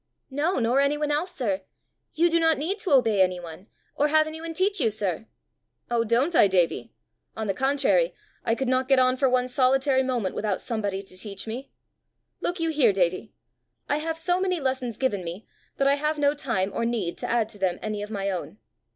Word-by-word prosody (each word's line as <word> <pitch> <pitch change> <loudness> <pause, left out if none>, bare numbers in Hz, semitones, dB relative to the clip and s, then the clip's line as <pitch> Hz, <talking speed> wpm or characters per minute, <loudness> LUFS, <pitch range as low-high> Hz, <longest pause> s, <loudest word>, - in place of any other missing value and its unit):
"No, 300 +7 0
nor 245 +2 +2
anyone 295 +1 +1
else, 310 +5 0
sir! 205 -7 -2 0.5
You 335 +2 +4
do 335 0 +2
not 325 -1 +3
need 365 +8 -2
to 390 -2 -3
obey 225 -7 +4
anyone, 180 0 -2 0.3
or 295 - +2
have 310 +1 +4
anyone 320 +1 -6
teach 395 +3 +1
you, 230 - +3
sir!" 210 -1 -3 0.6
"Oh, 235 -1 +2
don't 245 +9 +1
I, 205 - +7
Davie! 180 -3 +1 0.5
On 220 - -2
the 195 - 0
contrary, 280 - +2 0.3
I 225 - +1
could 265 +1 -2
not 255 0 +1
get 270 -1 +4
on 255 0 +4
for 265 0 +2
one 250 0 +2
solitary 265 +1 +3
moment 245 -7 -1
without 205 -3 -1
somebody 205 -4 -2
to 190 - -10
teach 195 +1 -6
me. 245 +5 -6 0.7
Look 350 +1 -2
you 330 -1 0
here, 280 -8 +4
Davie: 185 +2 0 0.6
I 290 - +1
have 320 +1 -3
so 355 +2 0
many 365 -2 0
lessons 260 -4 -2
given 205 -8 0
me, 175 +5 -7 0.3
that 275 - +2
I 280 - +5
have 300 +2 -1
no 285 -1 +3
time 230 -10 -1
or - - -1
need 225 -7 -1
to - - -4
add 230 -2 +2
to 205 - -13
them 185 -2 0
any 215 -1 -3
of 205 - -6
my 200 -2 -2
own. 185 +2 -5
255 Hz, 205 wpm, -25 LUFS, 205-295 Hz, 0.7 s, I